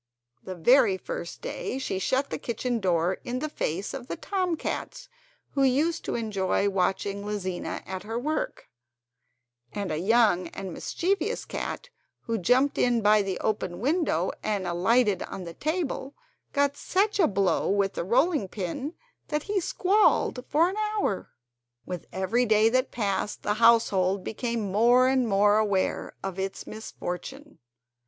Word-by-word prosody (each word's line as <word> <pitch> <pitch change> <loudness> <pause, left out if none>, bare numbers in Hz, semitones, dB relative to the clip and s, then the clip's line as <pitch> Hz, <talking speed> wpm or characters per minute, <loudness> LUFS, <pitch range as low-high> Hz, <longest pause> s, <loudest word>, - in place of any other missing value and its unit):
The 185 - -7
very 205 +2 +5
first 170 -1 -6
day 255 - -4
she 225 -8 -2
shut 265 +8 0
the - - -3
kitchen 240 +1 -2
door 180 -2 +1
in 245 +1 -3
the 310 - -2
face 195 - -3
of 260 -2 -6
the - - -3
tom 370 -4 -1
cats - - -5 0.4
who 275 - 0
used 290 +6 +2
to - - -2
enjoy 205 -3 0
watching 195 +1 -1
Lizina 195 -4 -4
at 185 -1 -5
her 225 +4 -4
work, 300 +6 -3 1.0
and 200 -4 -3
a 155 - -1
young 200 -3 +3
and 190 +1 -7
mischievous 395 - -1
cat - - -5 0.3
who 230 -1 -2
jumped 255 +9 +2
in 240 -3 +2
by 210 0 +5
the 195 -2 -3
open 210 -4 -1
kitchen 175 - -8
window 270 - +1
and 205 -3 -1
alighted 195 +3 +2
on 190 - -6
the 170 -1 -7
table 300 - -3 0.4
got 285 0 +1
such 405 +7 0
a 345 - +6
blow 195 -4 +1
with 200 0 +1
the - - -3
rolling 265 - +2
pin 205 - -4 0.3
that 300 -1 -1
he 405 -1 0
squalled 375 -8 +2
for 320 +4 +4
an 380 +3 -4
hour. 425 - -1 0.6
With 180 -2 -6
every 220 +7 +1
day 215 +1 +5
that 255 +3 +1
passed 205 -2 -2
the 210 - +1
household 200 -5 +4
became 235 +1 -2
more 235 +6 +4
and 260 -2 +2
more 205 +1 +4
aware 200 -3 0
of 195 -1 -4
its 195 0 -4
misfortune. 225 +7 -7
220 Hz, 155 wpm, -27 LUFS, 190-275 Hz, 1.0 s, a